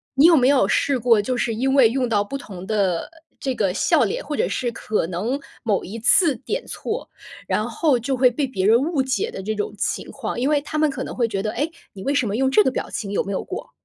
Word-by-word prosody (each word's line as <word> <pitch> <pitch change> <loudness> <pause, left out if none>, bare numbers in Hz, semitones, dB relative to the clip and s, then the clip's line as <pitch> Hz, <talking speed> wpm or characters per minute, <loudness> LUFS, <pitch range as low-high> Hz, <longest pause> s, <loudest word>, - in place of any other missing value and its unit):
你 275 +3 +6
有 335 0 +8
没 255 -3 +4
有 280 -2 +4
试 275 -2 +1
过 230 -2 +4
就 250 +5 -2
是 230 -2 -1
因 265 +4 0
为 265 -5 +6
用 250 0 -1
到 210 -3 +2
不 205 +7 -4
同 190 -8 -9
的 195 -6 0 0.3
这 265 -2 -2
个 195 -5 0
笑 310 - +3
脸， 205 - -2
或 295 - -3
者 - - 0
是 245 - -1
可 215 -6 -2
能 210 +11 -2 0.2
某 210 -5 0
一 205 +5 -7
次 295 - +4
点 - - -4
错， 450 +3 -5 0.4
然 - - 0
后 300 -6 +2
就 255 +3 -2
会 250 0 +5
被 260 +4 -1
别 195 -7 -1
人 225 +2 +6
误 305 -1 0
解 260 0 -1
的 - - -6
这 215 +3 -3
种 205 -1 -3
情 205 - -2
况？ - - -5
因 255 +4 +1
为 300 -1 +3
他 305 +2 -5
们 305 0 +3
可 275 - -5
能 - - -7
会 235 -2 +1
觉 195 -2 -2
得- 215 +1 -2
哎？ 295 - 0 0.3
你 190 - -9
为 280 - 0
什 260 -5 +1
么 200 - -2
用 265 +2 +1
这 240 - +6
个 265 - +3
表 260 - -4
情？ 200 -3 -5
有 - - +1
没 200 - -5
有 195 - -1
过？ 375 - -7
245 Hz, 285 characters per minute, -22 LUFS, 210-275 Hz, 0.4 s, 有